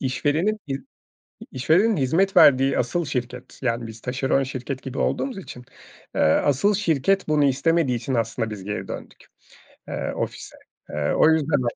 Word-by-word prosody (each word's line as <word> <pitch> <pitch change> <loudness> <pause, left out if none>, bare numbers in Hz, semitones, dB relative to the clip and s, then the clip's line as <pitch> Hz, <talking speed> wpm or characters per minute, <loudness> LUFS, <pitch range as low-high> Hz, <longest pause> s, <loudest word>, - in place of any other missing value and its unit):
işverenin 145 - 0
i 135 - -3 0.8
işverenin 175 - +2
hizmet 165 +9 +1
verdiği 135 0 +6
asıl 155 +8 0
şirket 125 -2 -5
Yani, 115 -2 -1
biz 110 0 -11
taşeron 135 +1 0
şirket 130 0 -5
gibi 135 0 -7
olduğumuz 265 -6 -1
için, 125 -9 -9 0.5
eee, - - +1
asıl 145 - +3
şirket 195 0 +1
bunu 150 -2 +3
istemediği 140 0 +2
için 120 +3 -3
aslında 115 -1 -1
biz 105 -3 -7
geri 105 +1 -4
döndük, - - -9 0.6
eee, - - -3
ofise. - - -5 0.3
Eee, 75 0 -1
o - - +5
yüzden 155 -4 +1
135 Hz, 150 wpm, -23 LUFS, 125-160 Hz, 0.8 s, verdiği